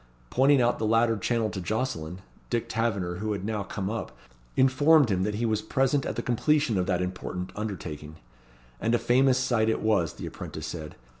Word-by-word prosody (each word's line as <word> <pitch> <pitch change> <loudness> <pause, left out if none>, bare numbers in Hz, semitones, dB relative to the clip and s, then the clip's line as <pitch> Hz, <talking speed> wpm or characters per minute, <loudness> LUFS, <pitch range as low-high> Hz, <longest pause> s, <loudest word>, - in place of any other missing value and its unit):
Pointing 135 0 +4
out 120 - +1
the 110 - 0
latter 115 +1 +3
channel 110 +1 0
to 95 - -5
Jocelyn, 90 -5 -3 0.3
Dick 120 -1 -1
Taverner, 100 -6 -1
who 105 +2 -2
had 100 -1 -4
now 105 -1 -2
come 100 -1 -4
up, 110 +2 -3 0.5
informed 135 0 +5
him 95 -1 +1
that 105 +2 -1
he 115 +3 -1
was 110 -2 0
present 135 +4 +1
at - - -3
the - - -3
completion 125 -2 +2
of 90 - -1
that 90 -1 +1
important 90 0 -5
undertaking. 80 -8 -6 0.6
And 115 +2 +1
a - - +4
famous 125 +3 +3
sight 120 -4 +1
it 110 - +1
was, 100 -8 +2
the - - -8
apprentice - - -7
said. 80 -3 -6
110 Hz, 195 wpm, -27 LUFS, 95-125 Hz, 0.6 s, informed